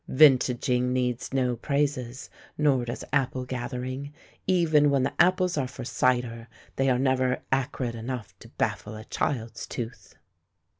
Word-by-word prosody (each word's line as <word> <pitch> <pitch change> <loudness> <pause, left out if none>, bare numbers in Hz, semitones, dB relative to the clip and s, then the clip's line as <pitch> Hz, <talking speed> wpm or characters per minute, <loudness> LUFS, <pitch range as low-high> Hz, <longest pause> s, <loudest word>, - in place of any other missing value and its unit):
Vintaging 125 -3 +4
needs 125 -1 -1
no 125 -2 +1
praises, 140 -1 -2 0.3
nor 140 -5 +3
does 120 - -5
apple 130 -2 +1
gathering; 130 +2 -4 0.4
even 160 -5 +4
when 140 -2 +2
the 135 - -1
apples 180 -1 +3
are 130 - 0
for 125 0 -8
cider, 120 -2 0 0.3
they 135 0 +2
are 125 - +3
never 130 -1 +1
acrid 135 -2 0
enough 115 -1 -5
to - - -13
baffle 105 +1 -2
a 110 0 -9
child's 115 -4 -3
tooth. 120 0 -7
130 Hz, 140 wpm, -27 LUFS, 125-140 Hz, 0.4 s, Vintaging